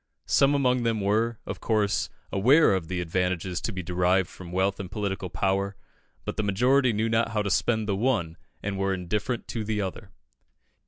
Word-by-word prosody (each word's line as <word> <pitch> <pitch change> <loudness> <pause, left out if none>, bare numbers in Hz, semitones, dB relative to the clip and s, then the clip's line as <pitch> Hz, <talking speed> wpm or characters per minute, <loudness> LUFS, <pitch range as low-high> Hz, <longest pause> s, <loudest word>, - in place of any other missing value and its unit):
Some 140 +1 +4
among 125 -3 +2
them 115 -2 0
were, 110 +3 +1
of - - -5
course, 105 -3 +1 0.2
aware 130 +8 +5
of 95 -4 -1
the 90 0 -2
advantages 90 +1 -1
to - - -2
be 95 -3 -5
derived 90 +1 +2
from 90 -2 -10
wealth 95 +2 0
and 95 -3 -5
political 100 -3 -3
power; 100 +2 0 0.5
but - - -4
the 110 - 0
majority 125 +6 +3
knew 110 +1 0
not 115 0 +1
how 105 -1 +1
to 100 - -1
spend 110 -1 +1
the 100 - +1
one, 100 -8 0 0.3
and 100 -1 -3
were 95 0 +1
indifferent 105 +6 -3
to 115 - -3
the 105 0 -2
other. 95 -2 -4
100 Hz, 190 wpm, -26 LUFS, 95-115 Hz, 0.5 s, aware